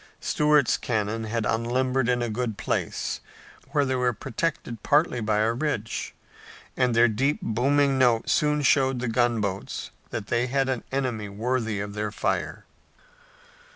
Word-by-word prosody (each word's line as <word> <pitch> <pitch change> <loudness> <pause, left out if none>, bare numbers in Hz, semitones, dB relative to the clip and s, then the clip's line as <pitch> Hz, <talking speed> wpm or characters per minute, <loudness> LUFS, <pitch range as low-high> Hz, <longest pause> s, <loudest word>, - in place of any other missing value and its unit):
Stuart's 150 -3 +3
cannon 110 -1 -2
had 110 0 -2
unlimbered 125 +3 0
in 120 -1 +1
a 120 - -2
good 110 -2 -2
place, - - -2 0.5
where 145 -2 +2
they 130 - 0
were 125 -1 +1
protected 120 -2 -3
partly 145 -4 +2
by 105 0 +1
a 110 +1 +2
ridge, 120 -5 -3 0.6
and 125 -2 +1
their 120 +1 +6
deep 135 +7 +1
booming 135 +4 +2
note 120 -3 +3
soon 150 -1 +2
showed 135 -2 +3
the 125 - -2
gunboats 115 -5 -1 0.2
that 105 - -4
they 120 +3 0
had 135 +1 0
an 130 -3 -2
enemy 125 -6 -2
worthy 110 0 -1
of 100 0 -4
their 105 0 -3
fire. - - -2
120 Hz, 150 wpm, -26 LUFS, 110-135 Hz, 0.6 s, their